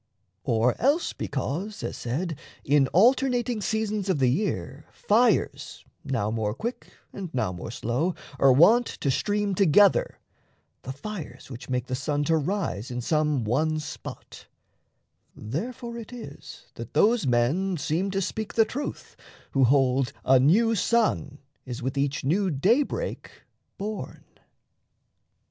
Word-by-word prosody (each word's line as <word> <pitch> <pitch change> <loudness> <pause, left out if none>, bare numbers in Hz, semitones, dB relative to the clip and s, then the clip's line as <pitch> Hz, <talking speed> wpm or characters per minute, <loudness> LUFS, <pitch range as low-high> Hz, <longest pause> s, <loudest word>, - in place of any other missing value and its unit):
Or 120 +1 +2
else 285 +8 +2
because, 165 +9 -4
as - - -4
said, 160 +8 -3 0.3
In 140 -1 +3
alternating 245 - +3
seasons 215 -2 -1
of 185 - +2
the 130 -3 +3
year 150 -4 -3
Fires, 225 -1 +1 0.2
now 105 +1 -1
more 110 -1 -1
quick, 235 - -5 0.3
and 185 -4 -6
now 125 -8 0
more 90 - -7
slow, 125 +9 -1 0.2
are 135 - +6
wont 220 - +6
To 140 - -2
stream 205 +6 0
together, 195 +1 +4 0.6
the 130 - -6
fires 145 - -8
which 120 +1 -9
make 125 -1 -1
the 130 - -6
sun 145 +3 -1
To 160 +3 +2
rise 155 - -2
in 125 -1 -4
some 150 0 +1
one 155 +8 0
spot 155 - -9 0.9
therefore 235 - -5
it 225 - -10
is 245 -2 -10
That - - -9
those 220 - +3
men 150 +11 +1
seem 165 +6 -1
to 195 0 -1
speak 220 +4 -4
the 225 - +5
truth 280 +6 -6 0.4
[who 135 -2 +4
hold 130 0 +2
A 130 0 +6
new 210 - +4
sun 220 -9 +1 0.3
is 125 -2 -7
with 130 +2 -2
each 140 0 -1
new 185 +8 +1
daybreak 235 - 0 0.5
born]. 210 +2 -6
160 Hz, 135 wpm, -26 LUFS, 130-215 Hz, 0.9 s, are